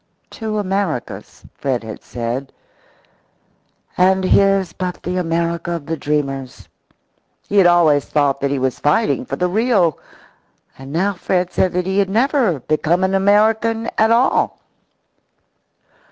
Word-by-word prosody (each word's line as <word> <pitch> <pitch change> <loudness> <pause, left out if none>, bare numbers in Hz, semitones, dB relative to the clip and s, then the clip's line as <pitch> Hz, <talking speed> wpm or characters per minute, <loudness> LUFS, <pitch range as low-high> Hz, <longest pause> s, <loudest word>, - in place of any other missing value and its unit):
Two 220 -2 -4
Americas, 195 - -3
Fred 130 -4 -2
had 110 -1 -8
said, 120 +3 -5 1.4
and 190 +1 +3
his 195 -2 +3
but 180 0 -5
the 180 +1 -3
America 170 0 -1
of 165 -4 -5
the 165 - -2
dreamers. 135 -4 -3 0.8
He 205 - -1
had 185 - +6
always 160 -5 +4
thought 140 -2 0
that 140 - 0
he 140 - -1
was 130 -1 -2
fighting 225 - +1
for - - -3
the 180 - 0
real. 195 - +1 0.8
And 135 +1 -11
now 190 +6 0
Fred 180 -1 -2
said 185 - +1
that 180 0 -1
he 190 +1 0
had 195 -1 +1
never 230 - +1
become 155 +6 0
an 190 0 +1
American 220 +3 +2
at 220 +1 +3
all. 235 +3 +2
180 Hz, 140 wpm, -18 LUFS, 150-200 Hz, 1.4 s, had